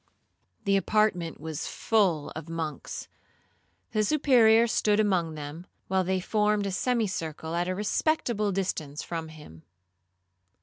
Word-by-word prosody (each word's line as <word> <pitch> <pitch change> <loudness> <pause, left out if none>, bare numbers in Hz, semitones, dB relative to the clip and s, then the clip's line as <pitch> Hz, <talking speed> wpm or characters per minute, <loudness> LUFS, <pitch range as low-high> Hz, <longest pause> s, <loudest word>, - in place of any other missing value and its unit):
The 195 0 +3
apartment 195 -5 +1
was 160 0 -5
full 185 -9 +1
of 160 +1 -8
monks; 165 -2 -5 0.8
the 215 -1 +1
Superior 235 -4 +5
stood 215 -2 +2
among 180 -7 +1
them, 150 +4 -7 0.2
while 190 0 +2
they 190 +1 0
formed 210 +1 +1
a 195 - -1
semicircle 185 - -2
at 175 +1 0
a 185 - -1
respectful 210 - 0
distance 160 -6 -3
from 165 -2 -4
him. 150 - -13
190 Hz, 125 wpm, -28 LUFS, 160-215 Hz, 0.8 s, Superior